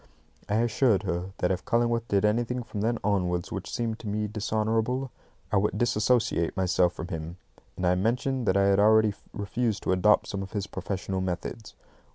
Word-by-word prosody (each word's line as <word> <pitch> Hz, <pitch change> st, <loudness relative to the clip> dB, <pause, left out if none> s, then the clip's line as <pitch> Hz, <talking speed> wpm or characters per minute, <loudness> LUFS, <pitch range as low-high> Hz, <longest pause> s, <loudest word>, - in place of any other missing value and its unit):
I 105 Hz, -, +1 dB
assured 115 Hz, -1 st, +2 dB
her 90 Hz, 0 st, -3 dB
that 90 Hz, -, +1 dB
if 90 Hz, -1 st, -2 dB
Cullingworth 115 Hz, 0 st, +1 dB
did 100 Hz, -1 st, +2 dB
anything 120 Hz, +3 st, 0 dB
from 110 Hz, -3 st, -5 dB
then 115 Hz, +2 st, +1 dB
onwards 90 Hz, -4 st, 0 dB
which -, -, -5 dB
seemed 115 Hz, -2 st, -2 dB
to 110 Hz, -, -8 dB
me 105 Hz, +1 st, -1 dB
dishonourable, 110 Hz, +4 st, -1 dB, 0.4 s
I -, -, +3 dB
would 105 Hz, +2 st, +1 dB
disassociate 110 Hz, -6 st, +1 dB
myself 90 Hz, -1 st, +2 dB
from 85 Hz, -, -7 dB
him, 85 Hz, 0 st, -5 dB, 0.4 s
and 90 Hz, -, -1 dB
I 90 Hz, -, +4 dB
mentioned 120 Hz, +5 st, 0 dB
that 95 Hz, -, +3 dB
I 100 Hz, -, +4 dB
had 100 Hz, 0 st, +4 dB
already 110 Hz, 0 st, +5 dB, 0.2 s
refused 105 Hz, +1 st, -2 dB
to -, -, 0 dB
adopt 95 Hz, +3 st, +4 dB
some 100 Hz, -, -4 dB
of 95 Hz, 0 st, -8 dB
his 100 Hz, -2 st, -2 dB
professional 95 Hz, 0 st, -4 dB
methods. 95 Hz, +4 st, -5 dB
105 Hz, 185 wpm, -27 LUFS, 95-115 Hz, 0.4 s, already